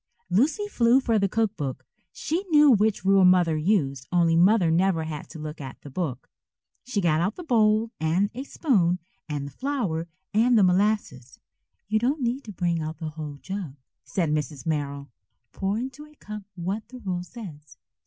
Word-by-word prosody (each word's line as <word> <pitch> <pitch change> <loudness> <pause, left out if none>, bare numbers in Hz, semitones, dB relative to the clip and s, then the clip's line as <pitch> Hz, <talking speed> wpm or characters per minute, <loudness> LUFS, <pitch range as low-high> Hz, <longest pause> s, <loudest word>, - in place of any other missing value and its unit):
Lucy 295 - +2
flew 245 - +4
for 230 -5 +1
the 200 -1 +1
cook 220 0 0
book. 135 -7 -5 0.3
She 335 +5 -2
knew 300 -2 +7
which 215 -4 +2
rule 195 0 +5
Mother 180 -3 +5
used, 150 - 0
only 170 -2 +3
Mother 180 0 +4
never 175 -1 +2
had 155 -2 -6
to 165 - -9
look 155 0 -7
at 130 -3 -8
the 145 - -11
book. 135 -5 -4 0.6
She 225 -5 -2
got 160 -3 +2
out 190 +4 0
the 360 - -8
bowl 220 -5 +3
and 170 +6 +1
a 255 +3 -5
spoon 195 - +1 0.3
and 145 -2 -3
the 140 - -8
flour 195 - -2 0.3
and 230 +3 +4
the 210 - +6
molasses. 180 - 0 0.5
"You 215 +1 +2
don't 265 +5 0
need 245 +4 -1
to 215 - -7
bring 170 -3 -1
out 155 +1 -5
the 160 -2 -4
whole 150 -1 -7
jug," 190 -8 -5 0.3
said 170 -5 -1
Mrs. 150 -2 -3
Merrill. 140 -3 -3 0.4
"Pour 195 +2 -2
into 265 +5 -6
a 300 - -21
cup 210 -6 -8
what 190 +5 -4
the 255 - -11
rule 185 -7 -3
says." 155 - -11
185 Hz, 185 wpm, -25 LUFS, 155-225 Hz, 0.6 s, knew